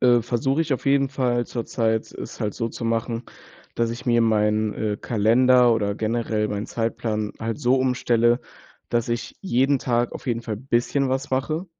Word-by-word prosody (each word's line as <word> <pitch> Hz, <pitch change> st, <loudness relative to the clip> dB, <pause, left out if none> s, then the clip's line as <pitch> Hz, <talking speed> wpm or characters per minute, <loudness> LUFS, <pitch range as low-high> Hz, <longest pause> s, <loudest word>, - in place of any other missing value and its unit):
äh, 120 Hz, -1 st, +5 dB
versuche 125 Hz, +5 st, 0 dB
ich 150 Hz, -4 st, +1 dB
auf -, -, -7 dB
jeden 140 Hz, 0 st, +3 dB
Fall 125 Hz, -3 st, 0 dB
zurzeit, 115 Hz, -2 st, -1 dB
es -, -, -8 dB
halt 105 Hz, -3 st, -2 dB
so 115 Hz, -1 st, -2 dB
zu 115 Hz, -, -7 dB
machen, 115 Hz, +1 st, -1 dB, 0.5 s
dass 115 Hz, 0 st, +1 dB
ich 120 Hz, +2 st, -7 dB
mir 120 Hz, -1 st, +3 dB
meinen, 110 Hz, -1 st, +2 dB
äh, 105 Hz, -1 st, -2 dB
Kalender 120 Hz, +3 st, +4 dB
oder 105 Hz, -3 st, 0 dB
generell 110 Hz, -1 st, -1 dB
meinen 105 Hz, +1 st, -3 dB
Zeitplan 115 Hz, -2 st, -2 dB
halt 115 Hz, 0 st, -3 dB
so 130 Hz, -2 st, +3 dB
umstelle, 120 Hz, -2 st, +2 dB, 0.5 s
dass 120 Hz, -1 st, 0 dB
ich 120 Hz, 0 st, -3 dB
jeden 135 Hz, -5 st, +2 dB
Tag 120 Hz, 0 st, 0 dB
auf -, -, -9 dB
jeden 120 Hz, -2 st, -1 dB
Fall 110 Hz, -2 st, -4 dB
bisschen 130 Hz, +3 st, 0 dB
was 135 Hz, +2 st, -2 dB
mache. 155 Hz, +7 st, -1 dB
120 Hz, 180 wpm, -23 LUFS, 110-130 Hz, 0.5 s, äh